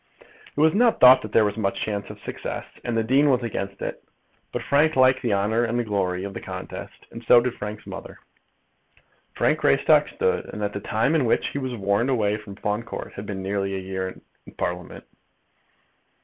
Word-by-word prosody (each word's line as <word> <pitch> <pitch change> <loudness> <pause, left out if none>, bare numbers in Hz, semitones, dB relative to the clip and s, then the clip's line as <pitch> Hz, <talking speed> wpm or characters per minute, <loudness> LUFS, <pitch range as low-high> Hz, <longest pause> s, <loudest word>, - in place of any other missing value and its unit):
It - - -1
was 160 +1 +5
not 235 +2 +3
thought 130 +1 +8
that 110 - -8
there 110 - +4
was 105 +1 -2
much 100 -2 -1
chance 100 -2 -3
of - - -10
success, - - -5 0.2
and 120 -1 -2
the 115 - +2
dean 135 +6 +3
was 125 -2 +2
against 100 -4 -4
it. - - -5 0.5
But - - -4
Frank 150 +3 +3
liked 130 0 +4
the 115 -5 +1
honour 110 +4 +1
and 120 +1 -1
glory 95 -3 -1
of 100 0 -5
the - - -6
contest, - - -8
and 115 - -9
so 120 +1 +7
did 120 0 -1
Frank's 105 +1 -7
mother. - - -8 1.2
Frank - - +2
Greystock - - +4
stood, - - -1
and 105 - -6
at 100 0 -2
the 100 - -3
time 110 +8 0
in 155 -5 +2
which 115 - +1
he 140 - -4
was 130 -2 -3
warned 100 +4 0
away 105 -5 +1
from 105 -2 -10
Fawn 105 +2 -2
Court 115 - -7
had 100 +1 -8
been 95 -2 -5
nearly 95 0 -2
a - - -2
year 95 0 -5 0.3
in - - -12
Parliament. 90 0 -4
110 Hz, 205 wpm, -24 LUFS, 100-125 Hz, 1.2 s, thought